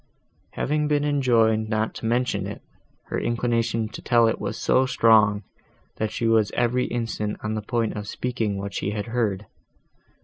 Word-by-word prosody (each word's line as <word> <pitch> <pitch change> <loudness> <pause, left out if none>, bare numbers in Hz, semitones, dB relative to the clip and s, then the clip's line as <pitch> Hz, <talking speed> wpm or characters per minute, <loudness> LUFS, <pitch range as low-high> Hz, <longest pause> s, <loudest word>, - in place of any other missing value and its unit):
Having 150 +1 0
been 145 -1 +1
enjoined 115 -6 +2
not 110 0 0
to 115 - -5
mention 125 +2 0
it, - - -8 0.5
her - - -1
inclination 115 -1 0
to 100 - -9
tell 120 -2 +4
it 115 - -1
was - - -3
so 130 +1 +2
strong, 110 -4 +4 0.5
that 110 - -1
she 115 - -3
was 110 -2 +3
every 125 +1 +1
instant 115 -3 -3
on 105 0 -2
the 110 - -2
point 115 +1 -1
of 105 -1 -5
speaking 115 -4 -2
what 100 0 -5
she 100 - -2
had 105 0 -3
heard. 110 -4 -1
115 Hz, 170 wpm, -24 LUFS, 110-120 Hz, 0.5 s, tell